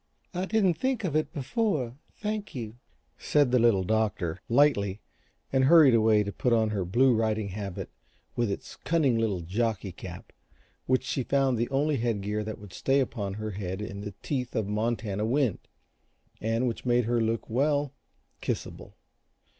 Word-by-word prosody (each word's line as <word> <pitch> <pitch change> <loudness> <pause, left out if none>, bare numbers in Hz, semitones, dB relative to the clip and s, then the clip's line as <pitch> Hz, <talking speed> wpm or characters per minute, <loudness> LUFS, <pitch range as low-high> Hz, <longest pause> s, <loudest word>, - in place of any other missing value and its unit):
"I 180 +1 -1
didn't 190 -6 +2
think 260 -4 0
of 165 -6 -1
it 155 - +1
before 145 - -1 0.2
thank 215 -2 -4
you," 115 -2 -6 0.4
said 145 -4 +2
the 125 - +4
Little 115 -5 +4
Doctor, 95 -4 -1
lightly, 110 -7 +3 0.5
and 130 -1 +4
hurried 155 -3 +7
away 110 -2 +4
to 100 - -4
put 125 +4 0
on 110 -2 +2
her 100 -4 -1
blue 120 +8 +4
riding 110 -2 0
habit 100 -1 -5 0.4
with 120 -3 +1
its 100 - -6
cunning 155 -7 +2
little 105 -6 0
jockey 100 +2 -1
cap 90 0 -10 0.5
which 130 0 +2
she 130 - -1
found 135 +1 +2
the 120 +1 -1
only 145 +2 +1
headgear 105 -3 -1
that 110 +1 -5
would 105 -4 -12
stay 135 +9 +2
upon 105 -7 -2
her 110 0 -4
head 95 -1 -4
in 100 -1 -5
the 105 -2 -7
teeth 125 -4 -3
of 110 - +1
Montana 105 -1 -1
wind, 125 -2 +1 0.8
and 115 +3 0
which 115 - -3
made 120 -1 +2
her 120 0 +1
look 115 0 -1
well, 145 +3 +1 0.5
kissable. - - -5
115 Hz, 165 wpm, -28 LUFS, 105-135 Hz, 0.8 s, hurried